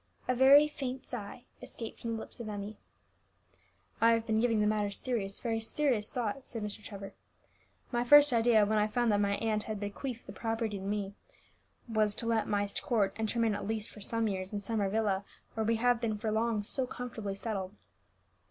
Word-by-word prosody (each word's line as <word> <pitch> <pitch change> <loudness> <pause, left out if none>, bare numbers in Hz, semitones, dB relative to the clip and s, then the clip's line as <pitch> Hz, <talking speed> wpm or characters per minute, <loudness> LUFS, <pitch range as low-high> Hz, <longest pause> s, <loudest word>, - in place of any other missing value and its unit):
A 255 - +3
very 275 +4 +7
faint 265 -3 -5
sigh 235 0 -6 0.2
escaped 225 -2 -8
from 230 -1 -3
the 225 - -3
lips - - -8
of 230 -2 -5
Emmie. 205 +1 -6 1.2
"I 230 0 +6
have 230 0 0
been 220 -1 +1
giving 230 -2 +2
the 210 - +3
matter 210 -1 +1
serious, 200 -2 -3
very 225 -1 -1
serious 225 -2 0
thought," 245 +2 -3
said 225 -4 -6
Mr. 210 0 -4
Trevor. 200 -2 -8 0.8
"My 240 -1 +1
first 290 +2 +7
idea, 225 -2 +5
when 215 +1 +2
I 210 - +3
found 240 +1 +1
that 205 - +3
my 200 0 +2
aunt 215 -1 -1
had 215 -2 -4
bequeathed 225 +4 -5
the - - -8
property 225 -3 -2
to - - -8
me, 200 0 -2 0.7
was 215 -2 +1
to 230 - 0
let 230 -1 +1
Myst 205 -1 -1
Court, 205 -5 +1
and 220 -1 -2
to 235 - -2
remain 230 -2 +3
at 205 - -4
least 220 -1 -2
for 210 - -12
some 230 +2 0
years 190 -2 -3
in 205 - -2
Summer 205 -1 -1
Villa, 205 -2 +1 0.3
where 220 -1 -1
we 230 - +3
have 240 +1 +2
been 220 -3 -1
for 215 +1 -2
long 220 -1 +1
so 255 +5 -2
comfortably 225 -6 -5
settled. 200 -2 -4
220 Hz, 205 wpm, -31 LUFS, 205-235 Hz, 1.2 s, very